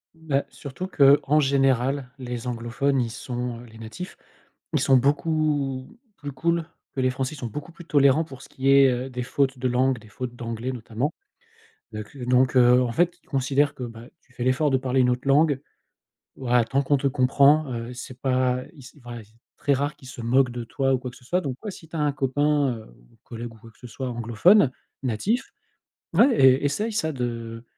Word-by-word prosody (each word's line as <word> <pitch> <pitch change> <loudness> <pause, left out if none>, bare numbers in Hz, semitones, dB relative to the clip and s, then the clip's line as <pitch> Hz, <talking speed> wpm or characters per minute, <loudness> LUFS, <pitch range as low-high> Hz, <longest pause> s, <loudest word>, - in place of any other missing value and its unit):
Bah, 150 -4 -1
surtout 145 +6 -7
qu'en 145 -2 +4
général, 135 -1 +1
les 125 -2 -6
anglophones, 125 +3 -1
ils 115 -2 -1
sont, 125 -2 -5
heu, - - -12
les 110 -1 -15
natifs, 115 +12 -8 0.6
ils - - +2
sont 135 - +4
beaucoup 145 - 0 0.2
plus 145 -1 -6
cools 170 +4 0 0.3
que 135 - 0
les 130 - +3
français. 130 +3 -3
Ils - - -12
sont 125 - -5
beaucoup 150 - -7
plus 170 - -12
tolérants 145 0 +4
pour 135 -5 -12
ce - - -12
qui 135 +1 -1
est, 135 -1 +7
heu, 125 +1 -2
des 125 -1 -4
fautes 135 0 0
de 130 - 0
langue, 125 0 +1
des 110 - -16
fautes 120 +3 -6
d'anglais, 115 +1 -4
notamment. 120 +4 -3 0.8
Donc 110 +5 -8
donc 125 0 +2
heu, 125 0 +6
en 120 -2 0
fait, 175 +7 +1
ils - - -33
considèrent 140 +1 +1
que, - - -9
bah, 115 -1 -8
tu 125 - -28
fais 125 0 -4
l'effort 130 +4 +2
de 135 - +3
parler 130 0 0
une 125 -1 +4
autre 125 +2 -2
langue. 145 0 +3 0.8
Voilà, 125 -2 +2
tant 135 +4 0
qu'on 140 +1 +2
te 140 - 0
comprend, 140 +2 +3
heu, 115 +1 -5
c'est 125 +1 -9
pas, 130 -1 +1
ils 145 - -15
c'est 125 - -14
ouais, 120 -2 -7
c'est 110 +2 -25 0.2
très 145 - +1
rare 145 +2 -1
qu'ils 130 - -14
se 130 -2 -8
moquent 125 +2 +3
de 120 0 -5
toi 135 +3 0
ou - - +3
quoi 125 - -6
que - - -16
ce - - -20
soit 180 +9 0
donc 135 -6 -4
ouais 210 - -4
si 160 - -13
tu 165 - -10
as 160 - -2
un 150 -1 +2
copain, 145 0 +1
heu, 110 - -11 0.3
ou - - -25
collègue 115 0 -8
ou - - -16
quoi 115 +1 -15
que - - -29
ce 125 - -10
soit, 130 +2 -5
anglophone 120 - +4 0.3
natif, 135 - -1 0.6
ouais 265 -3 +5
es 130 -2 +5
essaye 210 +11 -1
ça 200 -8 -1
de, 115 -2 -5
130 Hz, 215 wpm, -24 LUFS, 125-145 Hz, 0.8 s, est